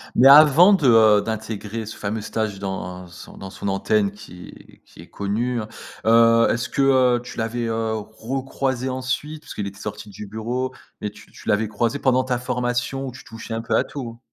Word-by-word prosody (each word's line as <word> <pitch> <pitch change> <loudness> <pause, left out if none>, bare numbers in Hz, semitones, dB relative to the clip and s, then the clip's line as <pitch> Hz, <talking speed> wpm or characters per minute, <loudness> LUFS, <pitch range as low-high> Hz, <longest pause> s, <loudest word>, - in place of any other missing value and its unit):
Mais 130 - +6
avant 155 +7 +8
de, 185 -7 +1
heu, 110 -3 +6
d'intégrer 110 0 -5
ce 110 - -8
fameux 105 +2 -3
stage 110 -2 -3
dans 90 -2 -5
son 85 - -13
dans 95 - -8
son 100 - -6
antenne 100 +1 +1
qui 100 -4 -14
qui - - -15
est - - -14
connue, 115 +5 -2
hein, 105 - -5 0.4
heu, 115 +1 +5
est-ce 120 - -2
que, - - -1 0.4
heu, 120 - -6
tu 125 - -9
l'avais, 115 +1 -2
heu, 115 -1 -1
recroisé 130 +4 -3
ensuite 130 +4 -3
puisqu'il 105 -8 -6
était 100 0 -8
sorti 105 - -7
du 105 +2 -9
bureau 120 +5 -3 0.3
et 105 - -2
tu - - -17
tu - - -15
l'avais 105 +2 +2
croisé 115 +5 -1
pendant 130 -2 +2
ta 125 -1 -1
formation 125 +2 -2
où 130 - -5
tu 130 - -13
touchais 115 0 -7
un 115 - -3
peu - - -1
à - - +3
tout? 120 -5 -8
115 Hz, 195 wpm, -22 LUFS, 105-130 Hz, 0.4 s, avant